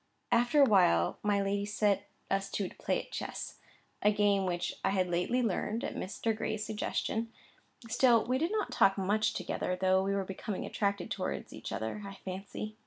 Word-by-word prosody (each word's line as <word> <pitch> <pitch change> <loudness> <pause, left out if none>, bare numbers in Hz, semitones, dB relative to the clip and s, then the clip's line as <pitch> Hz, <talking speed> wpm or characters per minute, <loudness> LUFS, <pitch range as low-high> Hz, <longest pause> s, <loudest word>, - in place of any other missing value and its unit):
After 240 +5 +4
a - - +8
while, 90 - +4
my 205 -1 +2
lady 200 +1 0
set 205 -1 +1 0.2
us 195 0 0
two 200 - -1
to - - -13
play - - 0
at - - -9
chess, - - -5 0.4
a 210 - +5
game 205 -2 +2
which 175 0 -1
I - - +3
had 190 -2 +1
lately 180 +9 +1
learnt 220 +1 -1
at - - -3
Mr. 220 +3 -2
Gray's 215 0 -2
suggestion. 225 +1 -2 0.6
Still 235 0 +4
we 255 +2 +1
did 330 +5 0
not 430 -1 -1
talk 195 0 +4
much 215 +3 +1
together, 180 - -2
though 190 0 +4
we 195 +1 0
were 195 -1 -1
becoming 195 +1 -4
attracted 200 -3 -1
towards - - -3
each - - -7
other, 110 - -3
I 195 0 -7
fancy. 195 +3 -6
200 Hz, 185 wpm, -32 LUFS, 190-220 Hz, 0.6 s, a